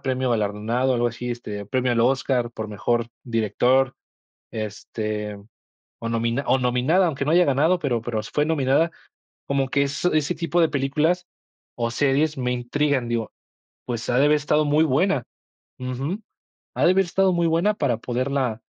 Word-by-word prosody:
premio 130 -2 -1
galardonado 115 +4 0
o - - +1
algo 120 0 +2
así, 120 +2 -6
este, 105 -4 -6
premio 125 +3 0
al 115 - +1
Óscar 125 -1 +1
por 110 -2 -6
mejor 120 +3 -1 0.2
director, 125 +3 +2 0.6
este, 105 -1 -4 0.6
o 115 - -3
nomina 115 +4 -1
o 130 - +3
nominada, 130 +9 +2
aunque 140 -4 -2
no 150 - +1
haya 175 +1 +6
ganado, 150 +6 +2
pero 125 -5 0
pero 115 -1 -3
s 105 - -9
fue 150 - +2
nominada 155 +1 +2 0.6
como 135 -1 0
que 140 +1 +2
eso 140 +6 -1
ese 155 -2 +1
tipo 170 +1 -1
de 160 - +4
películas 150 +6 0 0.5
o 115 -1 -1
series 145 +4 +1
me 125 -1 -1
intrigan, 125 +1 0
digo: 115 -2 -2 0.5
"Pues 120 -2 -4
ha 125 - +2
de 140 - +5
haber 150 +1 +4
estado 150 +1 +1
muy 150 +2 +3
buena 150 0 +2 0.6
ujú, 135 - -3 0.5
ha - - +2
de 175 - +6
haber 195 0 +3
estado 190 +2 +2
muy 170 -1 +2
buena 170 +6 +2
para 135 - 0
poderla 125 -1 -2
130 Hz, 175 wpm, -23 LUFS, 120-150 Hz, 0.6 s, haya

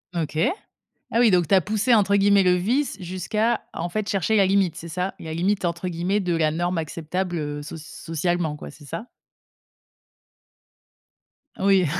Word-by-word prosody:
OK. 155 -2 -2 0.7
Ah 230 - +2
oui, 235 -3 +6
donc 175 -4 +3
tu - - +4
as 185 - +5
poussé, 215 +5 +2
entre 200 -2 +3
guillemets, 200 0 +5
le 180 -1 +4
«vice» 235 +5 0
jusqu'à, 195 +6 -1
en 170 +1 -3
fait, 215 +3 -2
chercher 200 +3 +1
la 200 - +5
limite, 190 -3 +2
c'est 170 -1 -8
ça? 180 +3 -3
La 160 -1 -7
«limite», 190 +3 0
entre 170 +1 -1
guillemets, 180 +4 0
de 175 -3 0
la 155 -2 +2
norme 175 +3 -1
acceptable, 170 +3 -3
heu, 145 -1 -4
soc 155 +2 -8
socialement, 165 +1 -2
quoi, - - -9
c'est 145 0 -15
ça? 165 - -6 2.5
Oui, 195 -2 +4
180 Hz, 170 wpm, -24 LUFS, 165-200 Hz, 2.5 s, oui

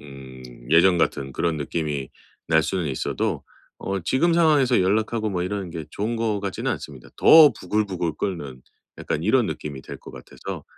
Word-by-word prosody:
음 65 -2 -12 0.3
예전 85 +2 +5
같은 70 -5 -1
그런 85 +4 -1
느낌이 75 -2 -3 0.4
날 80 -1 +4
수는 85 +1 -2
있어도 65 -2 -2 0.4
어 95 0 -3
지금 135 - +1
상황에서 150 - +4
연락하고 110 +3 0
뭐 90 -2 -2
이러는 95 0 -3
게 80 -2 -6
좋은 110 +6 -3
것 110 -3 -1
같지는 100 -2 -3
않습니다. - - -7
더 155 -4 +8
부글부글 95 -4 -1
끓는 70 -10 -4 0.4
약간 75 - -3
이런 120 +3 +3
느낌이 70 -3 -6
될 - - -9
것 - - -12
같아서 65 - -9
90 Hz, 340 characters per minute, -23 LUFS, 75-110 Hz, 0.4 s, 더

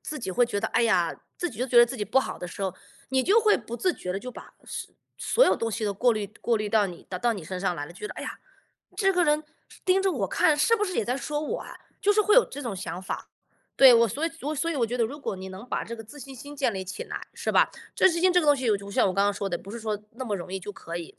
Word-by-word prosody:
自 305 - -5
己 190 - -4
会 245 +7 +3
觉 205 -4 -2
得， 220 - -1
哎 240 - +2
呀， 180 -7 +2 0.2
自 350 - -2
己 225 - -12
都 255 - 0
觉 250 - 0
得 240 - +10
自 250 +3 -6
己 210 - -3
不 220 +7 +3
好 - - -5
的 180 - -5
时 195 - -7
候， 190 -1 -1 0.4
你 260 -1 +3
就 405 - +5
会 430 -1 +4
不 235 0 -7
自 365 +7 +1
觉 180 - -5
地 195 - -2
就 250 +4 -7
把 - - -12
所 - - -7 0.2
所 - - +4
有 - - +4
东 225 0 -2
西 220 0 -2
都 205 - 0
过 240 +4 +3
滤 210 -1 -2
过 235 -1 +2
滤 210 -1 -2
到 215 -2 +4
你 175 -2 -10
到 180 - -3
到 240 +2 +2
你 195 - -7
身 185 +2 -5
上 190 -2 0
来 145 - -3
了。 - - -11
就 175 - -15
觉 210 - -3
得： - - -8
“哎 - - -6
呀， - - -6 0.6
这 390 -2 +3
个 355 -1 +3
人 300 0 +2 0.4
盯 375 +1 +4
着 385 -1 +1
我 200 -9 -1
看， 300 - +3
是 385 +10 +4
不 420 - 0
是 370 -3 -4
也 - - +1
在 245 +4 -1
说 295 +2 -3
我 305 - -3
啊？” - - -9 0.3
就 415 0 +4
是 425 - +4
会 420 +2 +4
有 - - +8
这 285 - -8
种 230 -6 -4
想 180 -1 -5
法。 190 - -5 0.4
对， 265 -2 +9
我 235 0 +6
所 285 +10 -3
以 330 - 0
我 295 +3 -2
所 330 +3 -1
以 320 - -2
我 235 -4 +2
觉 245 +3 -3
得 235 - +2
如 280 +7 -5
果 275 - -3
你 190 0 -7
能 190 +6 -10
把 - - -1
这 235 +1 -6
个 225 - -9
自 290 +7 -12
信 270 +2 -9
心 285 +3 -10
建 270 -5 0
立 190 -1 -4
起 185 - -6
来， - - -7
是 - - -2
吧？ - - +5 0.3
自 - - +6
信 335 -1 -1
心 370 0 +4
这 360 - +5
个 310 - -2
东 290 - +7
西 255 -5 0
我 205 - +3
就 200 0 -10
我 - - -8
就 - - -8
像 - - +4
我 - - 0
刚 200 +2 +2
刚 205 - +3
说 200 -1 -3
的， 175 - -2
不 195 - -15
是 235 +1 -6
说 215 -2 -2
那 255 +3 -6
么 210 -4 -1
容 180 +1 -8
易 190 - -3
就 205 - -6
可 170 -4 -7
以， 170 -2 -8
235 Hz, 365 characters per minute, -26 LUFS, 200-295 Hz, 0.6 s, 得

